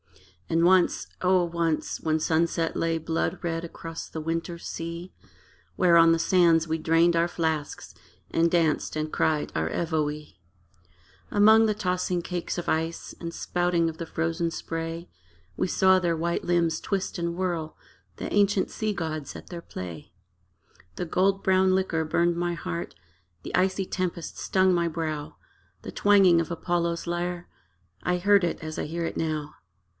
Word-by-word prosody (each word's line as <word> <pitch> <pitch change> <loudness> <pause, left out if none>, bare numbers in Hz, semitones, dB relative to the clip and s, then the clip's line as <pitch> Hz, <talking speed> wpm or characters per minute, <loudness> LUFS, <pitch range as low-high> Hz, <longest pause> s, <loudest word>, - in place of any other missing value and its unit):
And 165 +1 +3
once 185 0 +3
O 185 -1 +3
once! 170 -2 -1
when 160 0 +1
sunset 165 +1 0
lay 165 0 0
Blood 165 +2 -2
red 165 -1 -2
across 165 -1 -7
the 160 - -5
winter 165 +2 -3
sea, 170 +2 -6 0.6
Where 175 - +4
on 165 0 +7
the 165 - +2
sands 170 -2 +4
we 160 0 0
drained 165 +2 +3
our 170 +1 +3
flasks 160 -4 -3 0.4
And 165 0 +2
danced 160 -3 +1
and 155 0 -3
cried 155 -2 +1
our 80 +1 0
Evoe! 150 - -1 1.0
Among 220 +2 +6
the 215 - 0
tossing 180 -3 -1
cakes 175 0 -4
of 175 - -4
ice 165 +1 -2
And 170 -1 -4
spouting 175 -2 0
of 160 - -8
the 170 - -5
frozen 165 +1 -1
spray, 165 +1 -5 0.5
We - - 0
saw 190 +1 +4
their 170 -2 0
white 170 +1 -1
limbs 170 -2 +1
twist 195 -2 -2
and 170 0 -2
whirl 170 -4 -3 0.4
The - - -5
ancient 200 -1 +2
sea 215 -1 -2
gods 155 -5 -4
at - - -12
their 175 -2 -7
play. 85 - -8 0.8
The - - -3
gold 195 +3 +1
brown 190 0 +4
liquor 180 -4 0
burned 170 +2 +1
my 175 0 -1
heart, 85 - -5 0.5
The - - -3
icy 190 +1 +1
tempest 180 -3 -4
stung 185 -1 +2
my 170 -1 +1
brow: 155 -2 -4 0.5
The - - -6
twanging 195 -4 +5
of 165 - -5
Apollo's 170 0 -1
lyre 175 0 -3 0.5
I 180 0 0
heard 200 +1 +4
it 170 - -1
as 155 -1 -6
I - - -2
hear 170 +2 -3
it - - -4
now. 155 -2 -2
170 Hz, 160 wpm, -26 LUFS, 165-180 Hz, 1.0 s, on